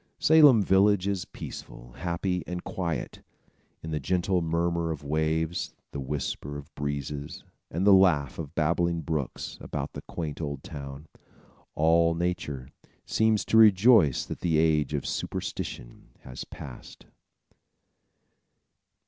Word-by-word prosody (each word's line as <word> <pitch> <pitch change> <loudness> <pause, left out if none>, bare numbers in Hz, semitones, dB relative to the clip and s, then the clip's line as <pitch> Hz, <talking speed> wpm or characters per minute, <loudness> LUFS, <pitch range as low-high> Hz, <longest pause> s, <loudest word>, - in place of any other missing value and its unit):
Salem 145 -8 +6
Village 95 0 +4
is 100 -3 -1
peaceful, - - -9
happy 90 +1 -2
and 90 0 -4
quiet. 85 -4 -4 0.6
In 80 - -5
the 75 - -1
gentle 90 +4 0
murmur 85 0 0
of 75 -3 -4
waves, 80 +3 -1 0.2
the 70 - -5
whisper 70 +1 -4
of 75 +3 -11
breezes 70 0 -4 0.3
and 90 +5 -1
the 100 - +7
laugh 85 -8 +4
of 80 0 -7
babbling 85 +2 +1
brooks, 75 -3 -4
about - - -5
the - - -7
quaint 80 -2 -5
old 70 -2 -4
town, 70 -5 -8 0.7
all 85 +1 +3
nature 80 -7 -3 0.4
seems 110 -1 +2
to 110 - +2
rejoice 105 - +6
that - - -6
the 85 -3 +1
age 75 -2 +2
of 70 - -3
superstition - - -5
has 65 - -8
passed. 65 -4 -11
80 Hz, 125 wpm, -27 LUFS, 75-90 Hz, 0.7 s, the